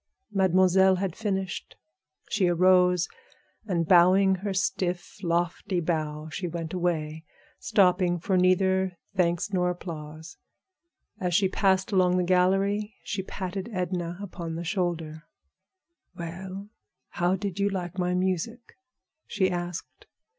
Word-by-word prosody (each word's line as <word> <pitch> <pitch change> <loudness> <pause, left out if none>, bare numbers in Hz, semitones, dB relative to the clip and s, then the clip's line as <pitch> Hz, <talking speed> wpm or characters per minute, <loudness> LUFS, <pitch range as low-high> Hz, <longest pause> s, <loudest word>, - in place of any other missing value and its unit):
Mademoiselle 190 -1 +4
had 185 -2 -2
finished. 195 -4 -3 0.5
She 200 -3 +1
arose, 180 0 +4 0.6
and 170 -5 0
bowing 185 +2 +6
her 200 +2 -3
stiff, 185 -1 -2
lofty 175 +1 -1
bow, 155 -2 -2
she 180 +4 -4
went 165 0 -5
away, 160 -3 -2 0.4
stopping 180 -2 +3
for 190 +3 -1
neither 185 0 +2 0.2
thanks 175 +1 +1
nor 180 -1 +2
applause. 160 -3 -7 0.8
As 180 -2 0
she 195 0 +4
passed 190 +2 +1
along 180 -2 +3
the 180 - +2
gallery 195 +4 +2
she 190 - -3
patted 190 +2 -5
Edna 180 -2 -3
upon 175 -4 -6
the 170 - -4
shoulder. 165 -3 -3 0.9
"Well, 185 +4 -7 0.4
how 175 +2 +1
did 195 0 -4
you 200 0 +2
like 185 -1 -4
my 180 0 +1
music?" 190 +6 -2 0.5
she 190 -2 +1
asked. 175 -1 -6
180 Hz, 120 wpm, -27 LUFS, 175-190 Hz, 0.9 s, bowing